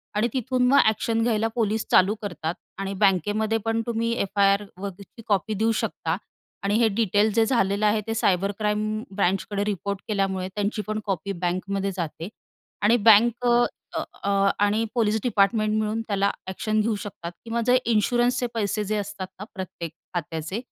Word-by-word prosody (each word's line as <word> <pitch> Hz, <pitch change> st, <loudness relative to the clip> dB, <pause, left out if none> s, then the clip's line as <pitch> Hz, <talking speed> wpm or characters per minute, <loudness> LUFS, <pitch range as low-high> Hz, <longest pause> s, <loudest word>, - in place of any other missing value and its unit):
आणि 215 Hz, +3 st, +2 dB
तिथून 255 Hz, 0 st, 0 dB
मग 275 Hz, +3 st, +5 dB
ॲक्शन 225 Hz, +1 st, +1 dB
घ्यायला 225 Hz, -1 st, +1 dB
पोलीस 220 Hz, -2 st, 0 dB
चालू 190 Hz, +3 st, +5 dB
करतात. 175 Hz, -5 st, -3 dB, 0.2 s
आणि 195 Hz, 0 st, -3 dB
बँकेमध्ये 205 Hz, +3 st, +2 dB
पण 225 Hz, 0 st, +1 dB
तुम्ही 230 Hz, 0 st, 0 dB
एफ-आई-आरवरची 200 Hz, +1 st, -1 dB
कॉपी 210 Hz, +1 st, +1 dB
देऊ 220 Hz, +2 st, +1 dB
शकता. -, -, -2 dB, 0.5 s
आणि 200 Hz, +1 st, +1 dB
हे 235 Hz, -, +5 dB
डिटेल्स 210 Hz, 0 st, +2 dB
जे 225 Hz, -1 st, +4 dB
झालेलं 205 Hz, -3 st, +1 dB
आहे, 210 Hz, +1 st, +3 dB
ते 225 Hz, -, -1 dB
सायबर 195 Hz, -2 st, +2 dB
क्राईम 215 Hz, +1 st, -1 dB
ब्रांचकडे 195 Hz, +1 st, 0 dB
रिपोर्ट 200 Hz, -1 st, -2 dB
केल्यामुळे 195 Hz, -3 st, -1 dB
त्यांची 210 Hz, +1 st, -1 dB
पण 215 Hz, 0 st, -2 dB
कॉपी 195 Hz, -1 st, -2 dB
बँकमध्ये 195 Hz, +2 st, -1 dB
जाते. 165 Hz, 0 st, -4 dB, 0.5 s
आणि 215 Hz, +4 st, +4 dB
बँक 235 Hz, +3 st, +5 dB
अ, 240 Hz, 0 st, +4 dB, 0.3 s
अ, -, -, -1 dB, 0.2 s
अ, 200 Hz, -, 0 dB, 0.3 s
आणि 210 Hz, +2 st, +2 dB
पोलिस 220 Hz, -2 st, +2 dB
डिपार्टमेंट 215 Hz, -1 st, +2 dB
मिळून 215 Hz, +1 st, -1 dB
त्याला 200 Hz, -1 st, +1 dB, 0.2 s
ॲक्शन 215 Hz, +3 st, -1 dB
घेऊ 220 Hz, 0 st, 0 dB
शकतात. 175 Hz, -5 st, -7 dB
किंवा 230 Hz, 0 st, -1 dB
जे 250 Hz, +1 st, +6 dB, 0.2 s
इन्शुरन्सचे 245 Hz, +3 st, +2 dB
पैसे 210 Hz, -1 st, -1 dB
जे 210 Hz, +1 st, -1 dB
असतात 200 Hz, -2 st, -4 dB
ना -, -, -5 dB
प्रत्येक 185 Hz, -4 st, -6 dB, 0.2 s
खात्याचे, 165 Hz, +2 st, -3 dB
210 Hz, 160 wpm, -25 LUFS, 195-225 Hz, 0.5 s, जे